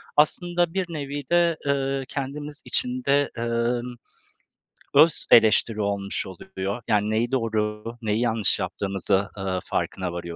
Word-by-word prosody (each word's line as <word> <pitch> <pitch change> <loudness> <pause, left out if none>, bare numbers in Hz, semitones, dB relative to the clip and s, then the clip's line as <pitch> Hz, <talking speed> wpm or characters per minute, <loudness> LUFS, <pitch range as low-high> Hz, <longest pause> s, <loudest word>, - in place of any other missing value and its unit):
Aslında 175 +3 +2
bir 190 -1 0
nevi 145 -1 -4
de, 170 -2 +3
ııı, 135 -1 0
kendimiz 145 +2 -5
için 125 0 0
de, 140 +1 +2
ımm, 120 +1 -1 1.0
öz 155 +3 +5
eleştiri 110 -1 +5
olmuş 100 -1 -1
oluyor, 95 +3 -5
yani 105 -1 +2
neyi 115 +3 0
doğru, 110 -4 -1 0.2
neyi 110 -1 0
yanlış 115 -4 +2
yaptığımızı, 100 0 -1
ııı, 95 -1 -2
farkına 90 -2 -3
varıyoruz. 85 - -4
120 Hz, 130 wpm, -24 LUFS, 105-145 Hz, 1.0 s, öz